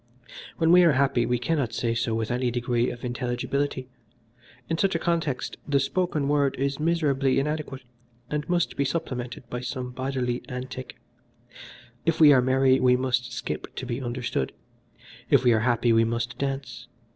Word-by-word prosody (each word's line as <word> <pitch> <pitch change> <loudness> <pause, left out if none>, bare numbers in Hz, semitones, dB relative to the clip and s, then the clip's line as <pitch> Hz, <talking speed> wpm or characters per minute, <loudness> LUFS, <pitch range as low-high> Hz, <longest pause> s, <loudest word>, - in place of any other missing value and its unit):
When 165 0 +3
we 180 +1 +8
are 165 -3 +5
happy 130 -3 +2
we 125 0 +1
cannot 125 -2 -1
say 115 0 0
so 115 -1 -1
with 110 0 -2
any 125 0 0
degree 120 0 0
of 120 +1 -7
intelligibility: 125 +2 -2 0.8
in 165 0 -2
such 195 -3 +2
a - - +4
context 165 -5 -1
the 140 -1 +3
spoken 150 0 0
word 145 -2 +2
is 140 +2 -1
miserably 145 -5 +1
inadequate, 140 -2 -2 0.4
and 150 +3 -3
must 175 -1 +1
be 140 - +1
supplemented 125 -5 -4
by 125 - -3
some 125 0 -4
bodily 125 -1 -2
antic. 130 0 -6 1.1
If 165 -1 0
we 150 -2 +8
are 130 - +5
merry 130 +1 +3
we 125 0 +4
must 125 -1 -1
skip 120 +1 -5
to 130 - -5
be 120 +1 -3
understood. 120 - -2 0.8
If - - +5
we 120 -2 +5
are 110 - +3
happy 120 0 +2
we 115 0 +5
must 115 +1 -2
dance. 135 -3 -4
130 Hz, 170 wpm, -26 LUFS, 120-145 Hz, 1.1 s, we